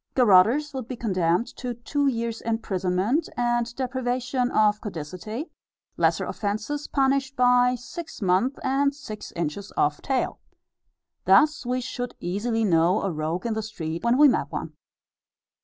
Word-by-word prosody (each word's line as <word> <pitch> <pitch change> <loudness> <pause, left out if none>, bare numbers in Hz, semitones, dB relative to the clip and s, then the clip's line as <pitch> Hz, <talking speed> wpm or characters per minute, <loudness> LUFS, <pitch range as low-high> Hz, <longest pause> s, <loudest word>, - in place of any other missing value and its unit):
Garotters 245 +6 +5
would 260 -4 -5
be 255 - -5
condemned 185 -4 +1
to 245 -1 -4
"Two 285 +4 -1
years' 230 -3 -2
imprisonment 215 - 0
and 240 -1 0
deprivation 250 -1 -1
of 210 -3 +2
caudicity." 205 - -6 0.4
Lesser - - +2
offences 215 +8 -3
punished 275 0 +1
by 250 0 +4
"Six 275 +9 -8
months, 195 +7 +1
and 275 +1 +1
six 220 -7 -8
inches 170 +5 -4
off 145 0 +1
tail." 265 -2 -1 0.9
Thus 300 -4 +4
we 250 +1 0
should 245 0 -5
easily 225 +6 -1
know 170 +1 +3
a 195 - 0
rogue 160 +4 -3
in 230 - 0
the 220 - -2
street, 170 -6 -5
when 235 +1 +3
we 295 +1 +8
met 260 - +1
one. - - -5
235 Hz, 140 wpm, -25 LUFS, 195-260 Hz, 0.9 s, we